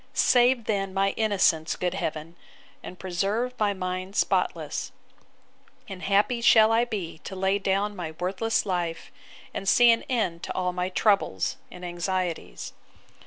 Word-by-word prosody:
'Save 245 -1 +4
then 195 -3 -2
my 195 0 +2
innocence, 190 -7 +1
good 180 -1 -2
Heaven! 160 -3 -4 0.5
and 180 - -9
preserve 200 +8 -1
my 210 -1 +2
mind 185 0 -4
spotless; - - -1 1.0
and 190 -2 -8
happy 205 +5 +1
shall 220 -2 +6
I 230 +1 +3
be 185 -9 -5
to 190 - -8
lay 190 +1 +1
down 200 +1 0
my 175 -4 -5
worthless 190 +5 0
life; 175 -4 -3 0.4
and 195 - -2
see 240 +3 +6
an 230 - +2
end 190 -10 -1
to - - -5
all 180 -1 -1
my 180 0 -2
troubles 190 - +1
and 180 0 -10
anxieties. 175 - -3
190 Hz, 145 wpm, -26 LUFS, 180-215 Hz, 1.0 s, shall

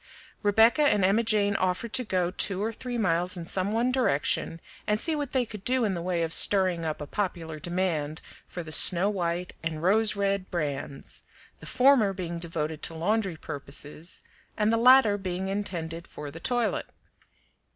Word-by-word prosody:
Rebecca 220 +7 +4
and 210 -10 +3
Emma 200 +4 +3
Jane 210 -3 +1
offered 185 +5 -1
to 255 - +3
go 185 -5 -1
two 190 0 +1
or 225 +1 -2
three 245 +1 -5
miles 180 -3 0
in 170 - -6
some 185 +3 -1
one 235 +3 +1
direction 165 - 0 0.3
and 210 0 +1
see 320 +4 0
what 290 -3 -3
they 255 -2 0
could 210 -3 -10
do 255 0 +2
in 200 - 0
the 170 - -4
way 175 -1 -1
of 165 0 -1
stirring 185 -4 +3
up 155 -1 -3
a - - -4
popular 165 -3 -4
demand 170 -3 -2 0.3
for 175 - -6
the 155 - -9
Snow 180 +5 +5
White 175 -2 -3
and 160 -1 -4
Rose 210 +4 +3
Red 200 -1 -1
brands, 145 -5 -4 0.4
the - - -11
former 250 -6 +4
being 175 -2 -5
devoted 160 -2 -4
to 165 - -2
laundry 190 +1 -1
purposes 145 +3 -5 0.3
and 215 0 +2
the - - +3
latter 240 -3 +6
being 190 0 -3
intended 170 -4 -4
for 145 -1 -8
the 165 - -9
toilet. 240 +3 0
185 Hz, 180 wpm, -27 LUFS, 165-215 Hz, 0.4 s, latter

